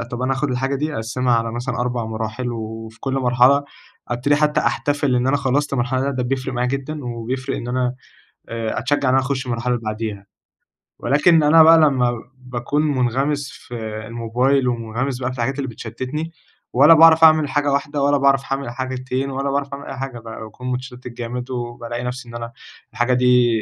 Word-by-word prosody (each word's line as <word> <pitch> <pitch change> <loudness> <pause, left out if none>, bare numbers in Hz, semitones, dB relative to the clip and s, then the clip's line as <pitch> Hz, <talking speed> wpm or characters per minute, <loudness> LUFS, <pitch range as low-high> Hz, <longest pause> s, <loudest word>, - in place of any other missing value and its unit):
أ 115 - -3
طب 120 +1 -6
أنا 130 - +1
آخد 135 +1 -1
الحاجة 130 +2 -1
دي 150 +2 -2
أقسِّمها 120 +2 0
على 115 -1 0
مثلًا 120 0 -3
4 120 -2 -1
مراحل، 110 +2 -4
وفي 110 0 -7
كل 135 -1 -2
مرحلة، 130 +2 +4 0.4
ابتدي 125 +5 +1
حتى 150 0 +2
أحتفل 140 +2 0
إن 125 - +1
أنا 145 +2 +3
خلَّصت 140 +1 0
مرحلة، 125 +1 0
ده 140 +1 0
ده 130 -2 -2
بيفرِق 130 +1 -2
معايا 125 +1 0
جدًا 140 +1 -4
و 120 -1 -5
بيفرِق 130 +2 -3
إن 120 - -6
أنا 125 0 0 0.6
آآ، 115 -1 -2
أتشجَّع 145 -2 +1
إن - - +3
أنا 135 - +5
أخش 135 0 -2
المرحلة 125 0 -1
اللي 120 - -6
بعديها، 110 -2 -4 0.7
ولكن 150 +5 +4
أنا 160 +2 +7
بقى 165 +1 +8
لما 135 -6 +3 0.2
باكون 125 +3 -2
مُنغمِس 140 0 0
في 120 - -11 0.3
الموبايل 125 +4 +1
ومُنغمِس 120 +2 -2
بقى 130 0 -2
في 130 - -8
الحاجات 130 +4 -1
اللي 140 -2 -2
بتشتِّتني، 130 +8 -5 0.4
ولا 145 +6 +7
باعرف 165 0 +7
أعمل 155 -3 +6
حاجة 145 +1 +1
واحدة 145 +1 -1
ولا 145 +1 +3
باعرف 135 0 +3
أعمل 135 -2 -2
حاجتين 130 +1 -3
ولا 135 +1 -2
باعرف 140 0 -2
أعمل 140 +1 -7
أي 135 - -6
حاجة 135 -3 -5
بقى، 115 -1 -9
باكون 125 +4 -6
متشتِّت 125 0 -6
جامد 125 +1 -6
وبالاقي 120 -1 -5
نفسي، 125 0 -5
إن 120 - -10
أنا 115 0 -6 0.4
الحاجة 120 +3 +1
دي 125 -1 +4
130 Hz, 195 wpm, -21 LUFS, 120-140 Hz, 0.7 s, بقى